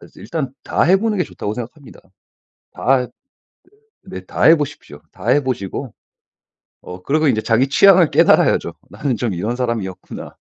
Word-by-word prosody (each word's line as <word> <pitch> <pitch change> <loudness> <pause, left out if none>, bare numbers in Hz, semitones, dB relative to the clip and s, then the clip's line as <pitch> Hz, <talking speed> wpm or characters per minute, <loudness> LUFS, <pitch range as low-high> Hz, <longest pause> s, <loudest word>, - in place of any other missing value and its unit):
일단 145 -6 -5
다 - - 0
해 185 +4 +4
보는 220 0 -1
게 180 - +1
좋다고 105 - -6
생각합니다. 125 +5 -10 0.7
다 130 -1 +1 1.0
네. - - -8
다 - - -5
해 165 - +7
보십시오. 145 - -7
다 100 +4 -8
해 145 +4 +3
보시고 125 0 -4 0.9
어 90 0 -10
그리고 155 +9 +1
인제 110 -5 +1
자기 120 +5 +1
취향을 185 +1 +5
깨달아야죠.' - - +3 0.2
나는 140 -4 -3
좀 115 -3 -2
이런 105 +8 -3
사람이었구나.' 115 -7 -5
130 Hz, 315 characters per minute, -18 LUFS, 110-150 Hz, 1.0 s, 해